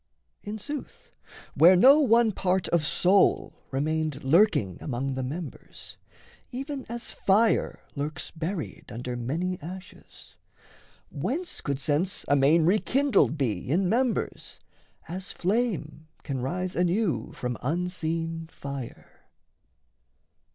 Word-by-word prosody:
In 210 +1 -5
sooth, 290 +6 -7 0.4
where 175 +3 +7
no 270 +11 +7
one 235 -5 +4
part 185 -1 0
of 170 -2 +2
soul 185 +6 +3 0.2
remained 155 +1 -1
Lurking 135 - +3
among 135 0 -2
the 130 - -3
members, 150 +5 -7 0.5
even 270 +2 -5
as 235 0 -4
fire 215 +4 +2
Lurks 145 +2 -4
buried 165 +1 -5
under 125 +2 -5
many 165 +10 -2
ashes, 180 +4 -11 0.7
whence 345 +6 -3
Could 140 -2 -2
sense 150 +6 0
amain 145 +4 +4
rekindled 215 - +3
be 115 -8 -2
in 180 +6 +2
members, 240 +4 -1 0.5
As 185 +3 -5
flame 180 -7 -1 0.2
can 135 -3 -3
rise 180 +7 -2
anew 180 +1 0
from 125 -1 -3
unseen 165 +1 -2
fire? 140 -5 -9
170 Hz, 110 wpm, -27 LUFS, 145-205 Hz, 0.7 s, where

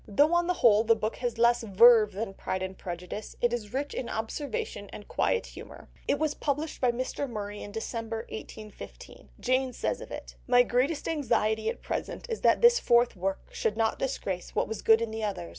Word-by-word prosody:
Though 290 +11 +3
on 345 0 +3
the 360 - +1
whole 220 -6 +5
the 230 0 +4
book 215 0 -3
has 245 -2 -3
less 235 +1 +4
verve 220 0 +6
than 200 0 -4
Pride 185 -1 -3
and 190 0 -5
Prejudice, 180 +4 -7
it 240 0 +1
is 215 -4 -4
rich 280 +3 -3
in 245 - -4
observation 220 -3 -4
and 205 - -10
quiet 470 - 0
humour. - - -11 0.2
It - - +2
was 305 0 0
published 295 +2 -3
by 250 -2 +4
Mr. 255 +3 -3
Murray 205 -2 -5
in 205 - -8
December 225 +1 -4
1815. 215 -1 -10
Jane 255 0 +1
says - - -2
of - - -9
it— - - -8
"My 245 0 +6
greatest 265 +6 0
anxiety 220 -7 +1
at - - -6
present - - -4
is 450 - -3
that - - +4
this 480 0 +7
fourth 240 - +3
work 195 +1 -3
should 215 0 -1
not 225 -1 +1
disgrace 195 -9 -3
what - - +1
was 220 0 -5
good 225 +1 +5
in 225 - -4
the 220 0 -4
others. 195 - -3
230 Hz, 205 wpm, -28 LUFS, 210-255 Hz, 0.2 s, this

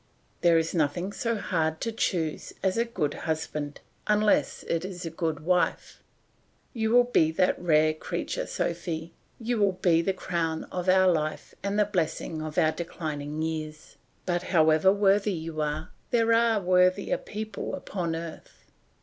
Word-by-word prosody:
"There 170 -1 +5
is 160 0 0
nothing 175 +4 0
so 230 +1 -1
hard 160 -5 -1
to 230 - -1
choose 170 -8 -2
as 190 -1 +2
a 230 +1 +2
good 165 -11 -2 0.2
husband, 150 -2 -3 0.3
unless 210 0 +2
it 165 0 -1
is 185 -2 -6
a 165 - -4
good 160 -3 -2
wife. 180 +2 0 0.7
You 220 -3 0
will 245 +2 +6
be 205 -10 +3
that 180 +2 +1
rare 155 -2 +4
creature, 155 - -4
Sophy, 170 -1 -3 0.3
you 235 0 -1
will 200 -2 +3
be 170 -2 +3
the 195 - +1
crown 165 -3 -2
of 180 0 -2
our 185 0 +5
life 155 -3 -1
and 200 +1 -2
the 210 - +4
blessing 165 -4 -2
of 155 -1 -6
our 160 -3 +4
declining 155 -3 -5
years; 155 -1 -5 0.3
but 175 -1 0
however 160 0 +4
worthy 200 0 +3
you 160 -2 -4
are, 150 +1 -3 0.2
there 230 -1 +3
are 230 -1 +4
worthier 185 +1 +2
people 215 -1 -5
upon 170 -4 -3
earth. 165 -1 -9
175 Hz, 160 wpm, -27 LUFS, 160-200 Hz, 0.7 s, will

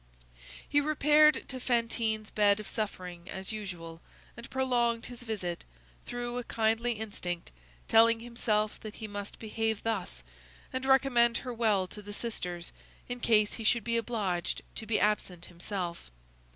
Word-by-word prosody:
He 290 0 +3
repaired 300 0 +5
to 260 - -4
Fantine's 230 -3 0
bed 205 -1 +4
of 210 - -7
suffering, 180 -5 -4
as 190 +2 -4
usual, 175 -6 -6 0.3
and 235 0 -10
prolonged 240 -3 +1
his 245 0 -8
visit, 200 -7 -3 0.4
through 245 0 -3
a - - -4
kindly 225 +1 +1
instinct, 200 - -5 0.4
telling 230 0 +6
himself 225 -3 -1
that 215 -1 -8
he 220 - -6
must 205 -1 -6
behave 220 -1 -2
thus, 195 - -2 0.5
and 260 +1 -2
recommend 245 -3 +5
her 250 - -3
well 215 -5 +2
to 210 +3 -10
the 205 0 -8
sisters, 180 -7 -4 0.3
in 245 0 -4
case 215 -3 +4
he 225 - -5
should 230 +1 +3
be 235 +1 0
obliged 205 -7 -1
to 220 - -6
be 225 - +2
absent 185 -4 0
himself. 175 - -5
220 Hz, 150 wpm, -31 LUFS, 200-240 Hz, 0.5 s, telling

